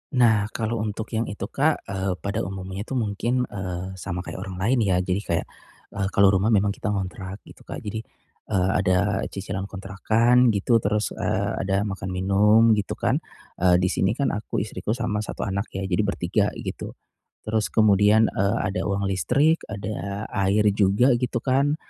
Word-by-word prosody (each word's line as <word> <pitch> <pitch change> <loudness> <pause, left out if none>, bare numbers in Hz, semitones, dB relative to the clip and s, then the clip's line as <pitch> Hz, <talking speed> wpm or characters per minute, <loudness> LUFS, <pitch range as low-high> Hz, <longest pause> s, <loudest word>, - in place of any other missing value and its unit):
Nah, 110 -5 +4
kalau 115 0 -1
untuk 105 +2 -4
yang 115 +1 -1
itu, 100 -1 -5
Kak, 150 +3 +1
eee 95 -1 -2
pada 100 -1 -2
umumnya 95 +2 -6
itu 135 - -4
mungkin 120 +2 0
eee 95 -4 -5
sama 90 -1 -4
kayak - - -7
orang 95 -1 -6
lain, 115 +8 +1
ya. 100 -5 +2
Jadi 90 +1 0
kayak, 85 -5 -2 0.5
eee, 95 -1 -2
kalau 100 -1 +6
rumah 95 +2 +2
memang 105 -2 +3
kita 105 - -5
ngontrak 95 -1 -4
gitu, - - -17
Kak. - - -6
Jadi, 110 +1 -4 0.5
eee, 95 0 +1
ada 95 +2 +2
cicilan 95 0 -5
kontrakan, 110 +6 +2
gitu. 115 +4 +3
Terus, 105 0 0
eee, - - -1
ada 95 +1 0
makan 95 -2 -4
minum, 105 +5 +4
gitu, 105 -3 0
kan. - - +1 0.4
Eee, 90 0 +5
di 95 - +2
sini 95 +4 +1
kan 140 +1 0
aku, 105 -1 -2
istriku, 105 +1 -3
sama 105 -4 -2
satu 105 - -4
anak, 100 +2 -2
ya, 95 - -2
jadi 95 -1 -1
bertiga, 90 -3 0
gitu. - - -6 0.5
Terus 110 0 0
kemudian, 105 0 +4
eee, 100 +4 +1
ada 100 - -2
uang 100 0 -1
listrik, 140 - +2
ada 100 0 -4
air 100 +2 +2
juga, 105 +6 +3
gitu, 120 -1 -2
kan. 140 +3 +2
100 Hz, 175 wpm, -24 LUFS, 95-110 Hz, 0.5 s, kalau